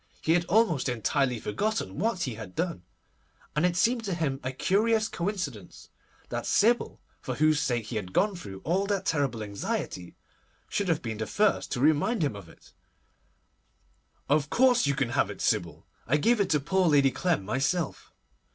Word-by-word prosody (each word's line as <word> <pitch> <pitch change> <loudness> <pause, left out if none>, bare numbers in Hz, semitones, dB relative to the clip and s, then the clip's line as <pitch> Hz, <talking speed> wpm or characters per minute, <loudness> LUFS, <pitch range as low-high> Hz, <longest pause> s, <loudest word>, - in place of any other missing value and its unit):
He 160 - +1
had 175 +1 +3
almost 170 - +2
entirely 125 +2 0
forgotten 175 - -2
what 195 -3 0
he 130 - -2
had 110 -4 -9
done, 170 - -2 0.7
and 150 +4 +3
it 175 -1 -2
seemed 235 +4 +2
to 190 -3 -2
him 145 -5 -1
a 130 - -2
curious 215 - +1
coincidence 170 - -5 0.4
that - - -4
Sybil, 235 +3 +2 0.2
for - - -4
whose 155 -1 +3
sake 120 -6 -1
he 110 +1 -4
had 95 -4 -5
gone 200 - +2
through 95 - -9
all 190 +5 0
that 195 -2 -1
terrible 135 -8 0
anxiety, 100 -3 -4 0.5
should 200 - -1
have 165 -3 0
been 110 -3 -4
the 110 - -3
first 210 -1 +1
to - - -2
remind 155 - +2
him 140 -8 -1
of 95 -5 -10
it. - - -19 1.5
'Of 145 0 +2
course 250 - +4
you 140 - +1
can 135 -4 0
have 120 - +1
it, - - -8
Sybil. - - -1 0.2
I 140 +6 +3
gave 230 +9 +2
it 200 -2 +1
to 150 - +3
poor 185 +6 +1
Lady 140 -3 +4
Clem 170 - 0
myself. 135 - -2
155 Hz, 180 wpm, -28 LUFS, 125-195 Hz, 1.5 s, course